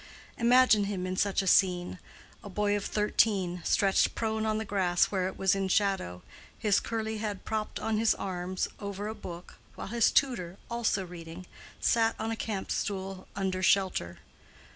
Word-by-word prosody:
Imagine 240 -3 +5
him 195 -2 -3
in 185 0 -2
such 200 +1 +1
a - - -4
scene: 180 -1 +3 0.4
a 205 - -8
boy 205 +1 +1
of 205 - -3
thirteen, 200 -4 +1
stretched 195 -1 +2
prone 220 -1 -1
on 215 0 +1
the 220 - -3
grass 185 -4 +1
where 185 -2 0
it 190 - -6
was 190 -1 +3
in 195 -1 -1
shadow, 190 - 0 0.3
his 210 -4 +2
curly 220 -1 -3
head 210 -3 -4
propped 215 -1 -3
on 220 -1 -1
his 225 0 +3
arms 185 -1 -3
over 200 0 -5
a 215 - -3
book, 175 -4 -9 0.2
while - - -7
his 235 0 +3
tutor, 190 -10 +1
also 225 -5 0
reading, 170 0 -9 0.3
sat 225 -1 +2
on 225 +1 -3
a - - -1
camp 210 -3 -4
stool 190 -1 -3
under 190 -1 -1
shelter. 185 - +1
200 Hz, 170 wpm, -29 LUFS, 185-220 Hz, 0.4 s, Imagine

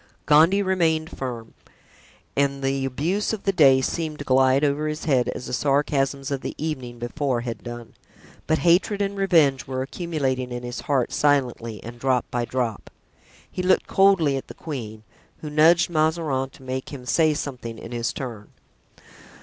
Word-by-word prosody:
Gondy 165 +7 +5
remained 165 -4 0
firm, 120 -4 -6 0.8
and 140 -1 0
the 135 0 0
abuse 165 - -1
of 215 - -5
the 195 - +2
day 135 -7 +5
seemed 155 +2 -2
to 145 - -7
glide 130 +1 +4
over 150 +1 +1
his 155 +1 -4
head 130 -6 +2
as 125 - -5
the - - -6
sarcasms 140 +1 0
of 135 -1 -2
the - - -5
evening 130 -6 -4
before 120 +1 -2
had 120 -1 -5
done; 120 -1 -8 0.5
but 155 - +2
hatred 180 +4 +3
and 200 0 -1
revenge 165 -9 +3
were 130 0 -2
accumulating 135 -5 -2
in 120 0 -5
his 120 0 -5
heart 140 -7 0
silently 125 -6 0
and 120 +1 -9
drop 130 -1 +1
by 120 -1 -1
drop. 120 -4 -3 0.6
He - - -3
looked 185 +1 +3
coldly 190 -8 +3
at 135 - -7
the - - -10
queen, 110 -8 -7 0.4
who 150 - -6
nudged 165 +3 +5
Mazarin 155 -4 0
to 135 - -17
make 130 0 -4
him 130 -4 -8
say 155 +3 +3
something 125 -6 -5
in 115 - -9
his 120 0 -1
turn. 115 -6 -7
140 Hz, 170 wpm, -24 LUFS, 125-160 Hz, 0.8 s, Gondy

